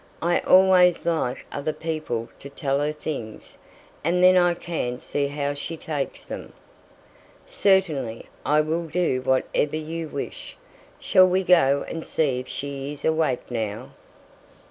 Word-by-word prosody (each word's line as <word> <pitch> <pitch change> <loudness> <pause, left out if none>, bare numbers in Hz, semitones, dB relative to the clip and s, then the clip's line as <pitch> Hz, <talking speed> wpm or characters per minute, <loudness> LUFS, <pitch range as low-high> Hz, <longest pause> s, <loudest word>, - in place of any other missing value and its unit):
"I 175 +1 +2
always 185 -2 +5
like 160 -7 -1
other 145 +2 -3
people 155 -9 -4
to 140 - -9
tell 140 0 -1
her 145 +1 0
things, 145 -8 -7 0.4
and 175 +3 +2
then 185 0 +7
I 175 -1 +4
can 155 -8 -3
see 140 +2 -2
how 145 0 -2
she 150 +3 -5
takes 150 -3 -4
them." - - -8 0.9
"Certainly! 155 - +1 0.2
I 150 +1 +3
will 165 +2 -2
do 160 -5 0
whatever 130 +3 0
you 160 +1 -4
wish. 140 - -7 0.4
Shall 185 0 +5
we 185 +1 +1
go 140 -7 +4
and 165 - -5
see 140 -6 0
if 125 - -8
she 140 0 -5
is 145 -1 -7
awake 155 -6 0
now?" 110 -3 -4
150 Hz, 145 wpm, -24 LUFS, 135-170 Hz, 0.9 s, then